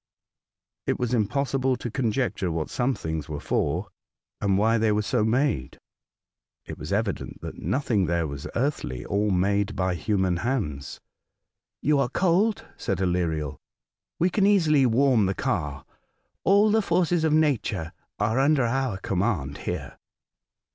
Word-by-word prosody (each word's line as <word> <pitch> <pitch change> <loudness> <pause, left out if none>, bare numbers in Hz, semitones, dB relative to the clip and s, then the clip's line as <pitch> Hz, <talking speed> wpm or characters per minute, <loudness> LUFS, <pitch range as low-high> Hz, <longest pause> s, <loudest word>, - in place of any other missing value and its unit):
It - - +1
was 125 -1 -1
impossible 130 +4 +1
to 120 -1 -6
conjecture 115 -6 -1
what 80 -1 -3
some 125 +1 0
things 80 -5 -4
were 75 -2 -4
for, - - -1 0.5
and 100 -1 +2
why 110 +3 +3
they 110 -1 +2
were 105 0 +1
so 110 +1 +1
made. 110 - 0 0.9
It - - -7
was 75 +3 -6
evident 100 -1 -2
that - - -7
nothing 105 - 0
there 85 0 +1
was 70 -1 -6
earthly, 125 - -2
or 105 +1 0
made 100 +2 +1
by 95 -1 0
human 95 -1 0
hands. 90 - -3 0.8
"You 150 0 +3
are 130 -3 +1
cold," 190 - +1
said 95 - -2
Aleriel. 85 -5 -1 0.6
''We 180 +2 +2
can 200 -2 +3
easily 155 -9 +4
warm 120 -3 +3
the 95 - -1
car. 75 -5 -2 0.6
All 205 +3 +5
the 220 +1 +4
forces 175 -3 +1
of 160 - +2
nature 125 - +1 0.2
are 110 +5 +1
under 140 0 +3
our 130 -3 0
command 90 -8 -1
here." - - -5
110 Hz, 145 wpm, -26 LUFS, 90-135 Hz, 0.9 s, All